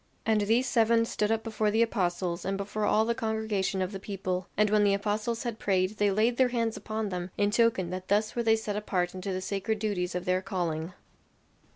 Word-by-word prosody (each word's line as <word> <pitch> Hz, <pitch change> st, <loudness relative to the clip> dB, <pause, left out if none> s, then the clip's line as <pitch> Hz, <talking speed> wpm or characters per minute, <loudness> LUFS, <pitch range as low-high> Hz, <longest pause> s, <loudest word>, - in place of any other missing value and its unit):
And 220 Hz, -1 st, +3 dB
these 230 Hz, +5 st, +2 dB
seven 230 Hz, -1 st, +3 dB
stood 210 Hz, -1 st, -1 dB
up 225 Hz, 0 st, 0 dB
before 220 Hz, -2 st, 0 dB
the 220 Hz, +2 st, +3 dB
apostles 175 Hz, -5 st, -1 dB
and 195 Hz, 0 st, -1 dB
before 205 Hz, +2 st, -2 dB
all 220 Hz, +1 st, +3 dB
the 235 Hz, -, +1 dB
congregation 220 Hz, -4 st, -1 dB
of 185 Hz, -, -4 dB
the 195 Hz, -, -6 dB
people; 190 Hz, -2 st, -3 dB
and 210 Hz, 0 st, +3 dB
when 210 Hz, -1 st, +4 dB
the 200 Hz, -1 st, +4 dB
apostles 215 Hz, +3 st, -2 dB
had 235 Hz, -3 st, -4 dB
prayed 190 Hz, +1 st, +1 dB
they 205 Hz, 0 st, +3 dB
laid 220 Hz, +5 st, +2 dB
their 260 Hz, -, +5 dB
hands 230 Hz, -2 st, -1 dB
upon 215 Hz, -1 st, -3 dB
them, 180 Hz, -1 st, -4 dB
in 205 Hz, 0 st, +2 dB
token 210 Hz, -5 st, +2 dB
that 185 Hz, 0 st, -5 dB
thus 210 Hz, +2 st, +1 dB
were 240 Hz, -, +1 dB
they 225 Hz, -1 st, +4 dB
set 215 Hz, -2 st, -3 dB
apart 185 Hz, -4 st, -1 dB
unto 185 Hz, +1 st, -4 dB
the 185 Hz, 0 st, -2 dB
sacred 200 Hz, +3 st, -2 dB
duties 200 Hz, -5 st, -2 dB
of 180 Hz, -, -3 dB
their 185 Hz, 0 st, +1 dB
calling. 175 Hz, -3 st, -3 dB
205 Hz, 220 wpm, -29 LUFS, 185-220 Hz, -, their